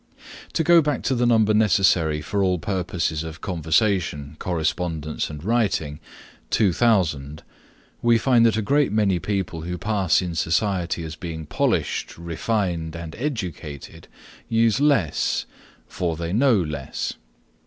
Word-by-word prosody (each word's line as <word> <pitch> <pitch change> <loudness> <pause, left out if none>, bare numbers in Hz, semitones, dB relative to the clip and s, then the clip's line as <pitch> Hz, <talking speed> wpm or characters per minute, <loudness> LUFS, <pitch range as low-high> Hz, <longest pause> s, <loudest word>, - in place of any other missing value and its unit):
To 165 - +1
go 170 0 +6
back 150 -3 -1
to 135 - +1
the 120 -1 +2
number 110 -2 +4
necessary 90 -7 +3
for 100 +5 -1
all 90 -1 +2
purposes 90 -3 -2
of 80 +1 -8
conversation 80 -4 0
correspondence 80 -2 -2
and 75 -1 -8
writing, 100 -9 0 0.5
2,000, 85 - +1 0.6
we 120 -1 +4
find 120 0 +3
that 110 - +1
a 110 - 0
great 140 +2 +2
many 100 -4 +2
people 95 -4 -3
who 90 +2 -4
pass 100 -3 +1
in 90 -2 -3
society 85 +1 0
as 80 -1 -6
being 80 -3 -6
polished, - - -1
refined 85 -1 -2
and 85 -1 -7
educated 90 - -5 0.4
use 115 +1 +3
less, 140 - +1 0.4
for 85 -3 -2
they 85 +1 -3
know 125 +2 +4
less. 75 -8 -3
90 Hz, 130 wpm, -23 LUFS, 80-110 Hz, 0.6 s, go